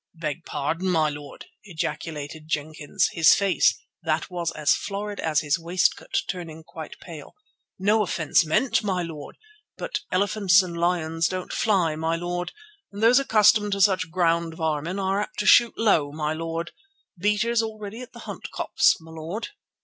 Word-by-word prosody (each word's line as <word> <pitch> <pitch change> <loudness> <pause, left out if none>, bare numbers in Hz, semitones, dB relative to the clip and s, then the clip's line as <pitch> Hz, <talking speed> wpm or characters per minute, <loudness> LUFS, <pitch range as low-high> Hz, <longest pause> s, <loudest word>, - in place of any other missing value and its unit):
"Beg 160 0 -4
pardon, 165 +6 -2
my 160 -3 +2
lord," 145 -1 -10 0.2
ejaculated 155 -3 -5
Jenkins, 155 +4 -1
his 165 -2 +6
face, 195 -1 +2 0.2
that 160 +1 -1
was 175 -2 -2
as 150 -1 +2
florid 205 0 -4
as 155 -2 +1
his 145 +1 0
waistcoat, 180 +3 0
turning 165 -3 -6
quite 160 -1 -10
pale; 160 -4 -11 0.4
"no 210 +3 +2
offence 165 -7 +2
meant, 215 +11 +1
my 185 -3 -1
lord, 155 -4 -8 0.4
but - - -3
elephants 195 0 +4
and 175 -2 -6
lions 170 -1 0
don't 185 -1 -5
fly, 180 -8 +1
my 160 +1 -1
lord, 175 +1 -3 0.4
and 205 +2 -6
those 245 +3 +6
accustomed 210 -4 +4
to 200 - -2
such 190 -4 +3
ground 170 -1 +1
varmin 160 +3 -2
are 195 +1 0
apt - - -6
to 210 - -2
shoot 235 +2 +6
low, 165 -10 +2
my 150 0 -2
lord. 165 +1 -4 0.4
Beaters 210 +5 +1
all 220 -1 -5
ready 215 +3 -7
at 250 - -10
the - - -12
Hunt - - -7
Copse, - - +2
my 160 0 -13
lord." 165 +7 -5
170 Hz, 165 wpm, -25 LUFS, 160-200 Hz, 0.4 s, his